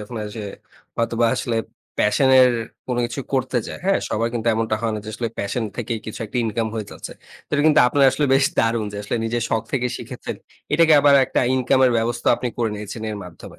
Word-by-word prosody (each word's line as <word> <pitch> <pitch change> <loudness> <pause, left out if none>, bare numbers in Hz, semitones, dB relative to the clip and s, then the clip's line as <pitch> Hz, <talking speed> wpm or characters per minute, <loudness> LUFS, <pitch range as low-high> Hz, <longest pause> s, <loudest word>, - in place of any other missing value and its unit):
যখন 105 +3 -8
ওইযে 105 +1 -6 0.5
হয়তোবা 115 0 +1
আসলে 115 -2 -2 0.4
প্যাশন 105 +6 +3
এর 125 -1 +6 0.4
কোনো 125 -1 -1
কিছু 120 +3 -5
করতে 130 -1 0
চায়। - - -7
হ্যাঁ? 195 +1 +3
সবার 115 +2 0
কিন্তু 115 -1 -3
এমনটা 110 -1 0
হয় 115 -1 0
না - - -3
যে - - -8
আসলে 115 -1 -2
প্যাশন 105 +4 -2
থেকেই 115 -2 -3
কিছু 110 - -7
একটা 105 - -7
ইনকাম 115 0 -1
হয়ে 110 -2 -4
যাচ্ছে। - - -8 0.3
তো - - -61
এটা 145 - +2
কিন্তু 155 - +6
আপনার 140 +2 +3
আসলে 135 +3 0
বেশ 135 - +4
দারুণ 115 -1 +1
যে 100 - -6
আসলে 105 - -2
নিজের 115 +1 -1
শখ 110 -1 0
থেকে 125 -2 +1
শিখেছেন। 120 +1 -7 0.4
এটাকে 165 -1 +5
আবার 145 0 +5
একটা - - 0
ইনকাম 130 +1 +2
এর 125 - +3
ব্যবস্থাও 120 +1 +1
আপনি 125 - -3
করে 115 -2 0
নিয়েছেন 105 +2 -7
এর 105 - -4
মাধ্যমে। 90 -2 -12
115 Hz, 215 wpm, -21 LUFS, 110-130 Hz, 0.5 s, এর